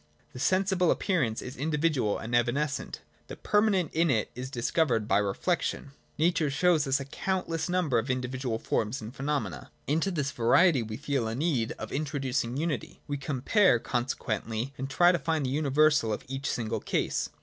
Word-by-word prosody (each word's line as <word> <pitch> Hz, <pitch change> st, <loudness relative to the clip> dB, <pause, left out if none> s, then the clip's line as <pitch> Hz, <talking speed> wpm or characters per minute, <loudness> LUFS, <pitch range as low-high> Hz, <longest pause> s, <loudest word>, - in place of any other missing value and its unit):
The 125 Hz, -, -8 dB
sensible 185 Hz, +2 st, +2 dB
appearance 135 Hz, -, 0 dB
is 125 Hz, -, -7 dB
individual 150 Hz, -6 st, 0 dB
and 120 Hz, +2 st, -3 dB
evanescent: 140 Hz, +5 st, -1 dB, 0.3 s
the -, -, -7 dB
permanent 205 Hz, -6 st, +1 dB
in 165 Hz, +1 st, +2 dB
it 115 Hz, -6 st, +1 dB
is 125 Hz, +1 st, -6 dB
discovered 120 Hz, -2 st, 0 dB
by 100 Hz, -, +3 dB
reflection. 135 Hz, -, -1 dB, 0.3 s
Nature 160 Hz, -1 st, +2 dB
shows 155 Hz, +1 st, +2 dB
us 135 Hz, +1 st, +2 dB
a 140 Hz, -, -5 dB
countless 165 Hz, +1 st, -2 dB
number 175 Hz, -9 st, +2 dB
of 115 Hz, +4 st, -4 dB
indi 130 Hz, -1 st, -1 dB
vidual 125 Hz, -3 st, -3 dB
forms 110 Hz, +2 st, -1 dB
and 110 Hz, +4 st, -9 dB
phenomena. 135 Hz, -, -3 dB, 0.2 s
Into 160 Hz, +7 st, +1 dB
this 145 Hz, -6 st, -1 dB
variety 135 Hz, +5 st, +4 dB
we 110 Hz, -1 st, -5 dB
feel 140 Hz, -4 st, -1 dB
a 110 Hz, -, -3 dB
need 135 Hz, -6 st, 0 dB
of -, -, -8 dB
introducing 135 Hz, -4 st, -2 dB
unity: 150 Hz, -6 st, -3 dB
we 145 Hz, -, -2 dB
compare, 140 Hz, -, +3 dB
consequently, 120 Hz, 0 st, -3 dB
and 135 Hz, +1 st, -5 dB
try 175 Hz, +6 st, +5 dB
to 175 Hz, -, 0 dB
find 155 Hz, 0 st, -1 dB
the 130 Hz, -, -1 dB
universal 145 Hz, -3 st, +3 dB
of 105 Hz, -, -3 dB
each 135 Hz, +1 st, -3 dB
single 115 Hz, -1 st, -2 dB
case. -, -, -1 dB
140 Hz, 170 wpm, -28 LUFS, 120-160 Hz, 0.3 s, try